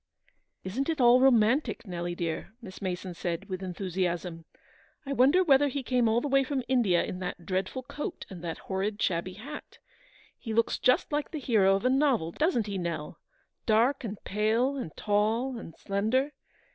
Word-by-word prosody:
" - - -49
Isn't 250 - -2
it 320 - -1
all 245 0 +6
romantic, 250 +1 +3
Nelly, 175 -2 -4
dear?" 170 +4 -4
Miss 195 -6 -11
Mason 185 -1 -3
said, 175 +2 -4
with 185 -1 -5
enthusiasm. 180 -2 -3 0.3
" - - -32
I 275 - -2
wonder 280 +8 +5
whether 290 -3 +5
he 275 0 -3
came 245 -2 +2
all 230 +2 +2
the 290 - -2
way 275 0 +3
from 265 -1 -2
India 230 -9 +3
in 180 - -5
that 180 -2 -5
dreadful 190 +7 -2
coat 300 +8 -6
and 180 -4 -10
that 165 -1 -4
horrid 200 +2 -2
shabby 185 0 -1
hat? 270 +10 -9 0.6
He 225 -2 -4
looks 230 - +2
just 255 - +2
like 295 0 -1
the 310 - -5
hero 210 -7 +3
of 195 - -3
a - - +5
novel, 265 - +2
doesn't 295 - +1
he, 200 -2 -3
Nell? 165 -4 -4 0.5
dark 240 +5 +3
and 215 -2 -4
pale, 220 +7 +1
and 250 - -5
tall 220 +5 0
and 165 -7 -10
slender. 220 +8 0
220 Hz, 185 wpm, -29 LUFS, 185-265 Hz, 0.6 s, all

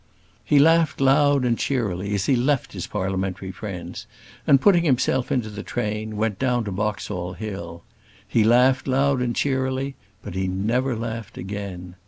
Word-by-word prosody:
He 145 - +3
laughed 165 +2 +4
loud 140 0 +4
and 120 -2 +1
cheerily 100 -6 -1
as 100 -1 -1
he 135 - +3
left 130 +2 0
his 90 -3 -5
parliamentary 95 -1 -3
friends, 95 -2 -7 0.4
and, 135 - +6
putting 175 +1 +4
himself 130 -3 +1
into 125 -4 0
the 105 0 -6
train, 110 -1 -3
went 105 -2 -1
down 125 -2 +1
to 105 - -4
Boxall 90 -3 -3
Hill. 85 -6 -7 0.4
He 115 - +2
laughed 125 +4 +4
loud 135 0 +2
and 120 -1 -1
cheerily; 130 0 -1 0.3
but - - -7
he 95 0 -1
never 115 +8 0
laughed 115 -1 -5
again. 95 -2 -6
115 Hz, 160 wpm, -23 LUFS, 95-130 Hz, 0.4 s, and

